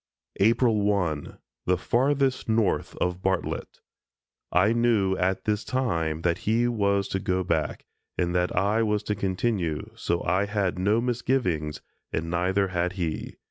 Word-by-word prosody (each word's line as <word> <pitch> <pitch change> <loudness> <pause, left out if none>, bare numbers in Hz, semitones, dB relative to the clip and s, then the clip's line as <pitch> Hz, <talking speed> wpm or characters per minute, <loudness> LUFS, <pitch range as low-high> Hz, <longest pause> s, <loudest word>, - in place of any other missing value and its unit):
April 115 +1 +3
1, 95 -8 -1 0.3
the 90 0 +3
Farthest 135 - +1
North 110 -2 +1
of 90 0 -2
Bartlett: 95 -1 -2 0.7
I 100 +6 +4
knew 115 -5 +2
at 95 +1 0
this 105 0 0
time 85 -12 -1
that 85 0 +1
he 115 +3 +1
was 100 -4 +1
to 95 - -1
go 95 0 0
back, 80 -4 -1 0.3
and 90 -1 0
that 90 0 0
I 105 +4 +2
was 105 -2 +1
to 105 - -1
continue, 95 -4 -1
so 85 - -2
I 95 +4 +1
had 100 -3 -1
no 105 +5 +2
misgivings 115 - -1 0.3
and 85 +1 -2
neither 95 +3 +1
had 90 0 -1
he. 85 -5 -3
95 Hz, 145 wpm, -26 LUFS, 90-110 Hz, 0.7 s, I